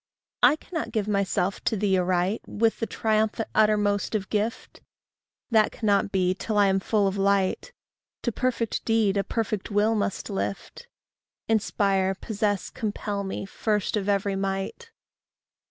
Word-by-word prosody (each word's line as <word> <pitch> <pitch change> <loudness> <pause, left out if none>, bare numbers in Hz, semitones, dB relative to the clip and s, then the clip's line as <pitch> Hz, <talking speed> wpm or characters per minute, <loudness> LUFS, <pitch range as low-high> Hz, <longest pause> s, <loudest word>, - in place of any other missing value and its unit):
I 250 +5 +6
cannot 315 -6 -5
give 215 -2 -1
myself 200 -2 0
to 220 - +1
thee 195 -1 +2
aright 180 +3 +1
With 225 +1 +1
the 225 - -1
triumphant 220 0 0
uttermost 210 -1 +2
of 195 -3 -2
gift; 215 +3 -2 0.7
That 220 -2 +4
cannot 205 -3 +1
be 185 -2 +2
till 210 +3 -3
I 205 - +6
am 190 0 +2
full 205 +1 +1
of 195 +1 -2
light 200 - +1 0.5
To 240 - 0
perfect 235 -1 -1
deed 225 -3 +2
a 200 - +1
perfect 215 -3 -2
will 210 +1 +2
must 205 -3 -2
lift: 100 +1 -4 0.6
Inspire, 195 -3 +1
possess, 205 -2 -2
compel 205 -3 -3
me, 195 0 -4
first 210 +1 -1
of 205 -1 -1
every 200 0 +1
might. 195 - -3
205 Hz, 145 wpm, -26 LUFS, 195-220 Hz, 0.7 s, I